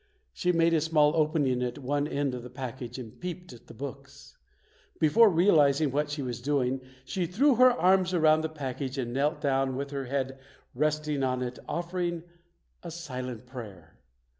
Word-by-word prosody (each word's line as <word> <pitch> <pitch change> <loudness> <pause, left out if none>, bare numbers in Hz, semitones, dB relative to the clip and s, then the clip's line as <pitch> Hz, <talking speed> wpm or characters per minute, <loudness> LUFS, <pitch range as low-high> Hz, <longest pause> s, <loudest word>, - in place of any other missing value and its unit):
She 180 - +1
made 165 -1 +3
a 160 - +3
small 155 -1 +3
opening 150 -5 +1
at 125 -1 -2
one 145 +1 -1
end 140 -3 -1
of 125 - -5
the 125 - -9
package 125 -1 -6
and 115 -4 -9
peeped 180 -4 -6
at 120 - -16
the - - -11
books. 140 +1 -9 0.6
Before 210 +9 +6
realiz 160 -6 +4
ing 150 -4 +1
what 145 +2 0
she 145 -1 -3
was 125 -1 -4
doing, 135 -1 0 0.2
she 180 +4 -2
threw 265 - +3
her 255 +1 +8
arms 185 -5 +3
around 155 -3 +4
the 160 - -2
package 135 -2 -5
and 120 -2 -3
knelt 145 +5 0
down 135 -2 +1
with 140 +1 -4
her 140 -1 -3
head 135 0 -3 0.3
resting 150 +1 0
on 130 -1 0
it, 125 0 -5
offering 175 0 -2 0.6
a 170 - -7
silent 130 -8 -6
prayer. 100 - -10
145 Hz, 180 wpm, -28 LUFS, 130-165 Hz, 0.6 s, her